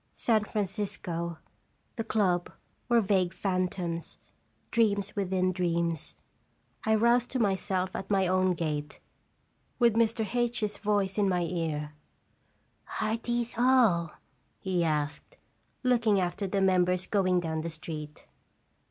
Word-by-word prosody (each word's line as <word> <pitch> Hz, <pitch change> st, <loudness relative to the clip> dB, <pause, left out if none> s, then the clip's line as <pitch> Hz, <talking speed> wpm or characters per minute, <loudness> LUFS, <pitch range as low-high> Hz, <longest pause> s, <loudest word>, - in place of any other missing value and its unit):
San 220 Hz, -3 st, +2 dB
Francisco, 185 Hz, -5 st, -3 dB, 0.6 s
the 225 Hz, -, -2 dB
club, 190 Hz, -6 st, +1 dB, 0.4 s
were 235 Hz, -1 st, +5 dB
vague 190 Hz, -3 st, +1 dB
phantoms, 180 Hz, -3 st, -2 dB, 0.5 s
dreams 205 Hz, -4 st, +1 dB
within 185 Hz, -2 st, +1 dB
dreams. 170 Hz, -3 st, -1 dB, 0.7 s
I 220 Hz, 0 st, +3 dB
roused 235 Hz, +2 st, +3 dB
to 260 Hz, -, -2 dB
myself 190 Hz, -3 st, 0 dB
at -, -, -5 dB
my 195 Hz, -2 st, +3 dB
own 185 Hz, 0 st, +2 dB
gate, 150 Hz, -3 st, -3 dB, 0.8 s
with 235 Hz, -2 st, +4 dB
Mr. 225 Hz, 0 st, +2 dB
H 240 Hz, -1 st, 0 dB
's 205 Hz, -1 st, -2 dB
voice 205 Hz, -1 st, 0 dB
in 200 Hz, -1 st, +3 dB
my 180 Hz, -1 st, +1 dB
ear: 160 Hz, -3 st, -3 dB, 1.1 s
"Are 220 Hz, +1 st, 0 dB
these 240 Hz, 0 st, -2 dB
all?" 230 Hz, -11 st, +4 dB, 0.4 s
he 185 Hz, -3 st, 0 dB
asked, 150 Hz, -2 st, -2 dB, 0.5 s
looking 230 Hz, -5 st, +3 dB
after 180 Hz, +2 st, -1 dB
the 195 Hz, +1 st, 0 dB
members 180 Hz, -1 st, +3 dB
going 185 Hz, -3 st, +2 dB
down 160 Hz, -2 st, -2 dB
the 165 Hz, -, -4 dB
street. 155 Hz, -2 st, -7 dB
190 Hz, 125 wpm, -29 LUFS, 170-215 Hz, 1.1 s, were